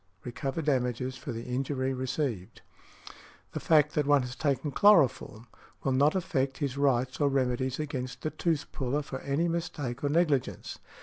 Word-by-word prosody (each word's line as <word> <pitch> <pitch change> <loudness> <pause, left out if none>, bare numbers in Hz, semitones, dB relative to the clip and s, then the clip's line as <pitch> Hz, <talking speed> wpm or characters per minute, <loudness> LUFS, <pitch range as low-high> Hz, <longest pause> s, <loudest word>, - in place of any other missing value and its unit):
_, - - -28
recover 135 +6 -3
damages 130 -2 0
for 140 - -6
the 115 0 -5
injury 130 +1 -2
received. 130 - -3 0.9
The - - -4
fact 150 -2 +3
that 150 -2 0
one 145 -2 +4
has 125 0 -6
taken 140 -1 -1
chloroform 130 - +4 0.4
will 135 - +1
not 140 +5 +3
affect 140 -8 -1
his 140 -4 -2
rights 130 -2 +1
or 145 - +4
remedies 130 0 0
against 130 -4 -4
the 155 - -1
tooth 165 -4 -1
puller 140 +2 -1
for 130 -2 -6
any 140 +6 0
mistake 165 -8 -3
or 145 - +1
negligence. 150 -4 0
135 Hz, 165 wpm, -29 LUFS, 125-150 Hz, 0.9 s, one